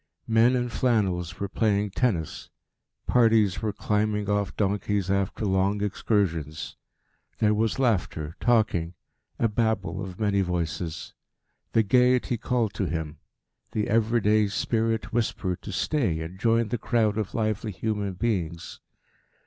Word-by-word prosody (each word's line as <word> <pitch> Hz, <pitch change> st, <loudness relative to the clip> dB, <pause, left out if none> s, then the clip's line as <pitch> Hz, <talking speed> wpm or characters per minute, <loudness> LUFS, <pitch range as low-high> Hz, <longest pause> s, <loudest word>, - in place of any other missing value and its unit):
Men 115 Hz, +2 st, +4 dB
in 125 Hz, -1 st, 0 dB
flannels 95 Hz, -8 st, 0 dB
were 100 Hz, -, -2 dB
playing 105 Hz, -1 st, 0 dB
tennis, 95 Hz, -, -1 dB, 0.6 s
parties 110 Hz, -5 st, +3 dB
were 110 Hz, -2 st, 0 dB
climbing 105 Hz, 0 st, -1 dB
off 105 Hz, 0 st, 0 dB
donkeys 100 Hz, -1 st, 0 dB
after 100 Hz, +2 st, -1 dB
long 100 Hz, +1 st, +1 dB
excursions; 80 Hz, -, -1 dB, 0.6 s
there 105 Hz, 0 st, +3 dB
was 110 Hz, +2 st, 0 dB
laughter, 95 Hz, -, 0 dB
talking, 105 Hz, -8 st, +1 dB, 0.4 s
a 115 Hz, -, +2 dB
babel 105 Hz, -3 st, -1 dB
of 95 Hz, -2 st, -8 dB
many 100 Hz, -2 st, +2 dB
voices. 85 Hz, -2 st, -3 dB, 0.6 s
The 115 Hz, -, +4 dB
gaiety 125 Hz, +1 st, +3 dB
called 115 Hz, -4 st, 0 dB
to 100 Hz, -, -2 dB
him; 80 Hz, -2 st, -4 dB, 0.5 s
the 105 Hz, -1 st, 0 dB
everyday 110 Hz, -1 st, +3 dB
spirit 115 Hz, +2 st, -1 dB
whispered 105 Hz, -6 st, -1 dB
to 105 Hz, -, -7 dB
stay 100 Hz, -, 0 dB
and 85 Hz, +4 st, -7 dB
join 115 Hz, 0 st, +2 dB
the 120 Hz, -, -2 dB
crowd 110 Hz, -3 st, +1 dB
of 105 Hz, -, -4 dB
lively 110 Hz, -1 st, -1 dB
human 105 Hz, -1 st, -2 dB
beings. 90 Hz, -6 st, -2 dB
105 Hz, 130 wpm, -26 LUFS, 95-115 Hz, 0.6 s, Men